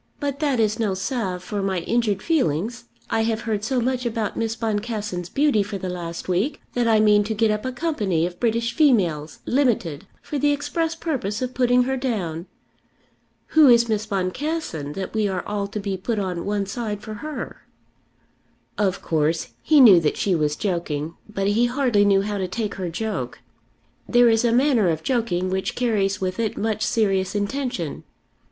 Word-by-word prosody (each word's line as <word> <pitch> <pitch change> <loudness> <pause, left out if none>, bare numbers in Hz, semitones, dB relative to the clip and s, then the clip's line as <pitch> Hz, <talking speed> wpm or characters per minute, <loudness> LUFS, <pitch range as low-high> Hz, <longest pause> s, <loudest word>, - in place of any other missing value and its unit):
"But 285 -2 -3
that 285 -5 +1
is 220 0 +1
no 210 -4 0
salve 190 -3 -3
for 205 0 -3
my 190 -2 -1
injured 215 -1 0
feelings 235 - 0 0.3
I 225 - +2
have 225 0 0
heard 220 -3 -2
so 260 +2 0
much 250 +1 0
about 225 -3 -2
Miss 225 0 -1
Boncassen's 210 -5 -3
beauty 280 -6 +2
for 200 0 -4
the 185 -1 -4
last 170 -2 -5
week, 185 - 0
that 240 -1 +1
I 220 -1 +4
mean 210 -1 +5
to 220 +1 -2
get 220 0 +3
up 210 +3 -2
a 260 - -1
company 220 - 0
of 175 0 -6
British 230 0 0
females, 180 - +2
limited, 205 - 0 0.2
for 295 - -3
the 290 +2 +3
express 325 +3 -2
purpose 260 - -2
of 255 0 -3
putting 250 0 +3
her 265 +1 -1
down. 190 -10 -3 1.0
Who 315 -2 +6
is 235 -1 +6
Miss 215 -1 -1
Boncassen 195 - -2
that 190 +2 -5
we 215 -2 +1
are 190 -2 -3
all 205 -1 -2
to 210 +1 -5
be 195 -1 -3
put 220 +5 -2
on 185 -3 -3
one 205 -1 0
side 210 0 -4
for 215 - -6
her?" 305 -1 -7 1.1
Of 195 -2 0
course 160 +1 0
he 305 -2 +4
knew 210 -9 +9
that 155 -2 0
she 195 - +1
was 150 -3 +1
joking, 165 -4 -2 0.2
but 195 -2 -2
he 230 +4 +3
hardly 240 -5 +2
knew 195 -1 +4
how 205 0 -3
to 185 - -1
take 210 +2 -3
her 185 -3 -4
joke. 220 +6 -3 0.7
There 240 -1 +6
is 225 0 +3
a 235 - +3
manner 245 -6 +3
of 160 -1 -2
joking 190 -8 0
which 190 0 -2
carries 205 -5 +1
with 185 +2 -3
it 225 -2 -1
much 220 0 -1
serious 195 -4 +1
intention. 205 - -2
215 Hz, 185 wpm, -23 LUFS, 190-240 Hz, 1.1 s, knew